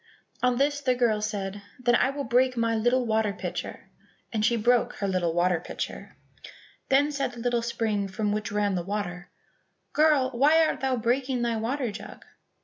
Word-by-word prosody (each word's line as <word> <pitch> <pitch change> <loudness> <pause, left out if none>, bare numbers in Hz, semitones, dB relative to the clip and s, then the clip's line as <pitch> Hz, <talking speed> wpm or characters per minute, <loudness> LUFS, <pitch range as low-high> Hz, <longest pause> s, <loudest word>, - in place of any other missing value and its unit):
On 250 -1 +2
this 285 +2 +1
the 255 -2 +1
girl 230 -4 +1
said, 205 -2 -3 0.2
"Then 245 -1 +1
I 250 - +3
will 280 +1 -4
break 255 +1 +2
my 230 0 +1
little 240 +3 +2
water 220 -2 +1
pitcher," - - -6 0.4
and 215 -1 0
she 235 +2 +3
broke 240 +2 +2
her 200 - -3
little 180 -3 0
water 175 0 +2
pitcher. - - -7 0.7
Then 285 +2 +3
said 275 -3 -2
the 240 - -10
little 240 0 0
spring 220 -4 -1
from 205 +2 -2
which 215 +1 -2
ran 205 -1 +1
the 180 - -1
water, 180 -2 -4 0.6
"Girl, 300 -4 +3
why 300 +6 +4
art - - -1
thou 265 -1 0
breaking 250 +2 0
thy 235 -1 0
water 240 +2 -2
jug?" 205 +1 -10
235 Hz, 180 wpm, -27 LUFS, 210-255 Hz, 0.7 s, why